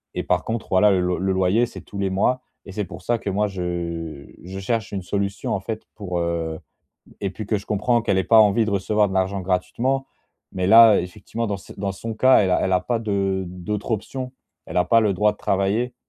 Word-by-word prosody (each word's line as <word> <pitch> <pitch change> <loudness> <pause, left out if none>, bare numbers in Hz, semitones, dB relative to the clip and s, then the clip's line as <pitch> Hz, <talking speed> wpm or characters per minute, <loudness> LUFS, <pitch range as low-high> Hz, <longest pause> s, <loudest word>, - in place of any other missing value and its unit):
et - - -2
par - - +1
contre, 115 0 -4
voilà, 95 +3 +5
le 95 - +2
loy 90 0 0
le 95 0 0
loyer, 95 +5 +2
c'est - - -10
tous 100 - -9
les 95 - 0
mois 115 +7 +1 0.2
et 100 - -9
c'est 105 +1 -3
pour 90 +1 -10
ça 120 +4 0
que 105 - -4
moi, 105 +2 +1
je 85 -5 -4 0.2
je 95 +2 -7
cherche 110 +1 -2
une 95 -2 -4
solution, 100 0 -2
en - - 0
fait, 110 +3 -5
pour, 95 -4 -4
heu, 85 -2 -2 0.6
et 100 - -1
puis 105 +3 -7
que 105 +1 0
je 100 - -10
comprends 115 +3 +1
qu'elle 100 -4 +1
ait 95 - +2
pas 110 +3 +6
envie 110 +1 +4
de 110 - -2
recevoir 105 +2 +1
de 95 - -5
l'argent 95 +1 0
gratuitement. 120 +9 -1 0.4
Mais 90 - -2
là, 110 0 +8
effectivement, 90 +6 -5
dans 100 -1 -2
cet 95 - -13
dans 100 0 -1
son 110 +4 -6
cas, 130 +4 +5
elle 95 -3 +2
a - - +3
elle 95 - +1
a 90 - +4
pas 115 +6 -1
de 100 -3 -1
d'autres 90 +5 -5
options. 125 +4 -3 0.3
Elle - - -4
a 90 - +4
pas 115 +6 +5
le 105 -3 +2
droit 105 +3 +3
de 105 - -13
travailler. 100 +6 0
100 Hz, 240 wpm, -22 LUFS, 95-110 Hz, 0.6 s, là